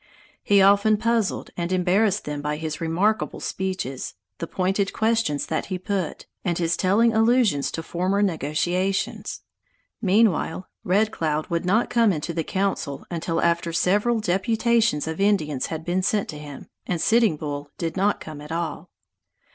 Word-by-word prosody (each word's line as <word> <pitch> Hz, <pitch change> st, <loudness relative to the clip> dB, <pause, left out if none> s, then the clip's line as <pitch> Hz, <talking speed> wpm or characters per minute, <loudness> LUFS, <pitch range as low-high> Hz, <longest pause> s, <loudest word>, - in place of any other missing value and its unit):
He 200 Hz, -1 st, +4 dB
often 200 Hz, +2 st, +5 dB
puzzled 225 Hz, -1 st, 0 dB
and 170 Hz, 0 st, -3 dB
embarrassed 190 Hz, +3 st, +2 dB
them 150 Hz, -1 st, -4 dB
by 150 Hz, +1 st, -2 dB
his 155 Hz, 0 st, -5 dB
remarkable 180 Hz, +7 st, 0 dB
speeches, 185 Hz, -, -4 dB, 0.2 s
the -, -, -4 dB
pointed 195 Hz, +2 st, 0 dB
questions 220 Hz, -9 st, +1 dB
that -, -, -2 dB
he 185 Hz, -, -3 dB
put, 185 Hz, -1 st, -3 dB, 0.2 s
and 175 Hz, -3 st, 0 dB
his 170 Hz, -1 st, +1 dB
telling 220 Hz, +5 st, +3 dB
allusions 225 Hz, -, +3 dB
to 165 Hz, -, -5 dB
former 185 Hz, +5 st, 0 dB
negotiations. 180 Hz, +3 st, -1 dB, 0.6 s
Meanwhile 190 Hz, -3 st, +2 dB, 0.2 s
Red 205 Hz, +4 st, +2 dB
Cloud 155 Hz, -4 st, -2 dB
would 170 Hz, +1 st, -1 dB
not 210 Hz, +6 st, +2 dB
come 230 Hz, -3 st, +4 dB
into 170 Hz, 0 st, -3 dB
the 165 Hz, -1 st, -1 dB
council 185 Hz, -7 st, -2 dB
until 165 Hz, -1 st, -1 dB
after 170 Hz, 0 st, +1 dB
several 205 Hz, +7 st, +2 dB
deputations 220 Hz, -2 st, +1 dB
of 160 Hz, +4 st, -3 dB
Indians 155 Hz, -10 st, +1 dB
had 160 Hz, 0 st, -5 dB
been 180 Hz, +2 st, 0 dB
sent 200 Hz, +2 st, 0 dB
to 150 Hz, -, -6 dB
him, 145 Hz, -2 st, -9 dB, 0.2 s
and 175 Hz, -, -1 dB
Sitting 220 Hz, -3 st, +3 dB
Bull 145 Hz, -1 st, -5 dB
did 165 Hz, -1 st, -3 dB
not 200 Hz, +2 st, +1 dB
come 155 Hz, -2 st, -9 dB
at 150 Hz, -, -10 dB
all. 170 Hz, 0 st, -3 dB
185 Hz, 155 wpm, -24 LUFS, 160-205 Hz, 0.6 s, often